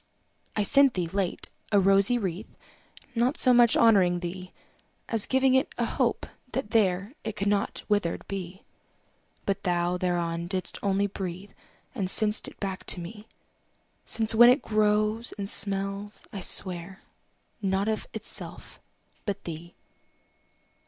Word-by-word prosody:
I 210 - 0
sent 275 +4 +6
thee, 180 -2 -1
late, 185 +1 -3 0.2
a 205 - +4
rosy 195 +5 +3
wreath, 195 -1 -5 0.6
Not 245 +4 0
so 255 - +6
much 240 -1 +5
honouring 185 -6 +3
thee, 180 +1 -7 0.6
As 225 -3 +3
giving 265 0 +2
it 265 +3 0
a - - 0
hope, - - -1 0.3
that 245 -3 -4
there 200 0 0
It 220 -1 -5
could 200 -1 -3
not 205 -1 -1
withered 205 -5 -2
be. 190 -1 -7 0.8
But 200 0 -2
thou 175 -1 -1
thereon 170 -2 -2
didst 185 0 -4
only 200 0 0
breathe, 190 0 -7 0.4
And 195 -8 -1
sent'st 210 +2 +4
back 195 -2 -5
to - - +3
me: 210 +5 -10 0.8
Since 225 -1 +1
when 240 +2 +7
it 255 +4 +2
grows, 215 +2 0
and 200 -1 -2
smells, 200 +1 +1
I 200 - -5
swear, 185 +1 -1 0.6
Not 195 0 -1
of 220 -1 -3
itself, - - -3 0.5
but 200 -1 -4
thee. 170 +1 -9
200 Hz, 140 wpm, -26 LUFS, 185-220 Hz, 0.8 s, when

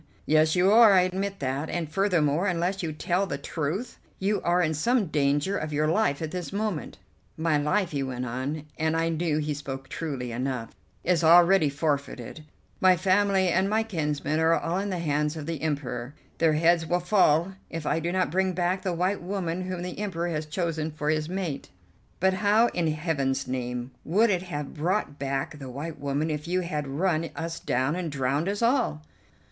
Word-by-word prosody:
"Yes, 155 +1 +3
you 185 +2 +4
are. 220 -2 +8
I 185 - +6
admit 190 +2 -2
that, 135 +3 -2
and, 170 -2 -2
furthermore, 175 -1 +1
unless 180 +1 0
you 165 -3 -2
tell 175 +5 0
the 140 - -3
truth 165 - -4 0.2
you 205 +2 0
are 175 +1 +2
in 160 -1 +1
some 230 - +2
danger 145 +3 +1
of 155 0 -4
your 150 +1 +1
life 165 -4 +1
at 155 - -4
this 180 0 -4
moment." 205 -5 -3 0.4
"My 160 -2 +2
life," 165 +6 +1
he 140 -2 -1
went 125 -2 -3
on, 130 +5 -4
and 160 +1 +1
I 165 0 +1
knew 165 -1 0
he 150 -1 -1
spoke 135 -2 -6
truly 135 -7 -4
enough, 125 -1 -3 0.3
"is 175 -1 +2
already 170 0 +6
forfeited. 140 -1 -3 0.4
My 185 -1 +5
family 190 +1 +3
and 190 +3 +2
my 220 +1 +2
kinsmen 155 -6 -1
are 165 +1 +4
all 170 +3 -1
in 200 +1 -2
the 185 - -2
hands 150 -1 0
of 155 - -5
the 165 -2 -4
Emperor. 140 -4 -3 0.2
Their 165 -2 +4
heads 165 +1 +3
will 175 +2 +1
fall 180 -1 +3 0.2
if 165 -2 -5
I - - +1
do 170 +2 -2
not 185 -3 0
bring 190 +1 +1
back 180 +1 0
the 185 -3 -1
white 185 +4 0
woman 185 -1 -3
whom 180 -1 -3
the 180 +2 -6
Emperor 175 -4 -2
has 155 -2 -3
chosen 160 -1 -2
for 150 -1 -1
his 155 0 -1
mate." 180 -6 -4 0.5
"But 190 +1 +3
how 210 +4 +3
in 170 -2 -1
Heaven's 150 -4 -1
name 125 0 -3
would 210 +7 +3
it 180 -2 +1
have 150 -6 -5
brought 165 -1 -1
back 140 +3 -3
the 135 -2 -7
white 145 +5 -6
woman 145 +3 -1
if 150 +1 -4
you 180 +1 +1
had 150 -5 -3
run 160 +3 0
us 165 0 -4
down 130 +5 0
and 175 -3 -3
drowned 140 +5 0
us 205 +3 -2
all?" 235 - +1
165 Hz, 195 wpm, -27 LUFS, 150-185 Hz, 0.5 s, are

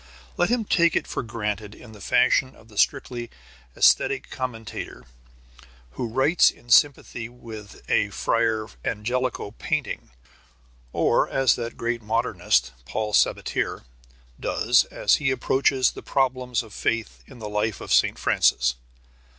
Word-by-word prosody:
Let 175 - +1
him 240 -2 +1
take 170 -3 +3
it - - +1
for - - -3
granted 105 -2 -4
in 115 - -14
the 105 -2 -14
fashion 130 +7 +2
of 115 - -19
the 105 - -15
strictly 120 -1 0 0.5
æsthetic 135 -1 +3
commentator 115 -4 -6 0.9
who 115 - -4
writes 135 +9 +4
in 120 - -12
sympathy 120 -4 +3
with 110 -4 -11
a - - +2
Fra 110 -1 0 0.2
Angelico 120 0 -2
painting, - - -3 0.8
or - - +2
as 135 -3 +3
that 120 -1 -6
great 120 0 -2
modernist, 105 - +1
Paul 105 - -3
Sabatier, - - +1 0.6
does 120 +2 +2
as - - +2
he 145 -2 0
approaches 130 0 +2
the - - -10
problems 130 -3 0
of 110 -3 -14
faith 110 - -2
in - - -13
the 110 -3 -7
life 105 -1 -1
of - - -2
St. - - +3
Francis. 60 -1 +2
115 Hz, 135 wpm, -24 LUFS, 110-130 Hz, 0.9 s, writes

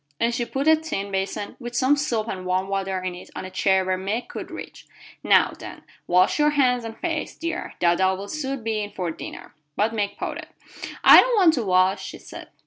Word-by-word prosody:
And 235 +1 +1
she 240 0 -1
put 270 +5 -3
a 315 - +7
tin 300 -11 -4
bason 195 +2 -3
with 240 -1 -7
some 260 +4 +3
soap 235 -7 -1
and 185 -4 -5
warm 185 +1 -1
water 195 -1 -2
in 185 -1 -3
it 180 - -11
on - - -5
a 185 - -8
chair 190 0 +2
where 185 0 -1
Meg 205 +6 -3
could - - -7
reach. - - -10 0.4
"Now, - - +4
then, - - -10 0.2
wash 180 +10 +3
your 300 0 +4
hands 255 -5 +2
and 225 0 -7
face, 325 -3 -3
dear. 335 +1 -5
Dada 185 +2 +3
will 195 +2 -7
soon 275 -2 -4
be 220 -1 -1
in 205 - -4
for 175 -3 -3
dinner." - - -9 0.2
But 220 +2 +1
Meg 205 -2 -2
pouted. - - -5 0.6
"I - - +10
don't - - 0
want 355 -5 +6
to 250 -7 -1
wash," 190 0 +2
she - - -7
said. - - -11
215 Hz, 220 wpm, -23 LUFS, 190-270 Hz, 0.6 s, I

